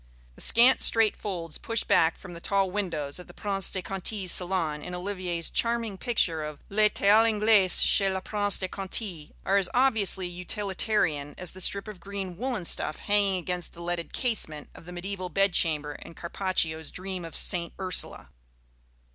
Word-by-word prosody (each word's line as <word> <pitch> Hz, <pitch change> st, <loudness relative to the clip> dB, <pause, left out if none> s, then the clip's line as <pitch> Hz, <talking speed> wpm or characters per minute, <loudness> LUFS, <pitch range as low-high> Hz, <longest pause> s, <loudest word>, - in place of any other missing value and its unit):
The -, -, -10 dB
scant 245 Hz, +3 st, +5 dB
straight 225 Hz, -2 st, +3 dB
folds 170 Hz, -6 st, -5 dB
pushed 230 Hz, 0 st, -2 dB
back 160 Hz, 0 st, +3 dB
from 180 Hz, -2 st, -11 dB
the 170 Hz, -, -8 dB
tall 195 Hz, -1 st, +1 dB
windows 165 Hz, -7 st, -3 dB
of 180 Hz, -, -11 dB
the 175 Hz, -, -14 dB
Prince 195 Hz, -2 st, -1 dB
de 185 Hz, -, -2 dB
Conti's 195 Hz, 0 st, -1 dB
salon, 175 Hz, -5 st, 0 dB
in 180 Hz, +4 st, -6 dB
Olivier's 180 Hz, -2 st, -4 dB
charming 230 Hz, -3 st, 0 dB
picture 170 Hz, -9 st, +1 dB
of 150 Hz, -1 st, -7 dB
"Le 210 Hz, +1 st, +4 dB
Thé -, -, -5 dB
à 215 Hz, +2 st, +7 dB
l'Anglaise 215 Hz, -4 st, +5 dB
chez 195 Hz, -2 st, +3 dB
le 190 Hz, 0 st, -1 dB
Prince 205 Hz, +1 st, -1 dB
de 185 Hz, -, -1 dB
Conti," 185 Hz, -4 st, -3 dB
are 195 Hz, -, +3 dB
as 195 Hz, -2 st, +2 dB
obviously 220 Hz, -8 st, +2 dB
utilitarian 180 Hz, -4 st, -1 dB
as 180 Hz, -2 st, -3 dB
the 185 Hz, -, -7 dB
strip 200 Hz, +3 st, +1 dB
of 210 Hz, -4 st, -8 dB
green 195 Hz, -1 st, -6 dB
woollen 235 Hz, -2 st, -3 dB
stuff 155 Hz, -, +1 dB
hanging 205 Hz, -2 st, +2 dB
against 180 Hz, 0 st, -4 dB
the 170 Hz, -, -11 dB
leaded 175 Hz, -1 st, -3 dB
casement 160 Hz, -, -3 dB
of -, -, -14 dB
the -, -, -8 dB
mediæval 185 Hz, 0 st, -5 dB
bed 195 Hz, +2 st, +2 dB
chamber 150 Hz, -3 st, +1 dB
in 165 Hz, -, -12 dB
Carpaccio's 170 Hz, -3 st, -2 dB
"Dream 185 Hz, -1 st, -6 dB
of 165 Hz, -, -9 dB
St. 170 Hz, -2 st, -1 dB
Ursula." 185 Hz, -1 st, -1 dB
185 Hz, 180 wpm, -27 LUFS, 170-205 Hz, -, à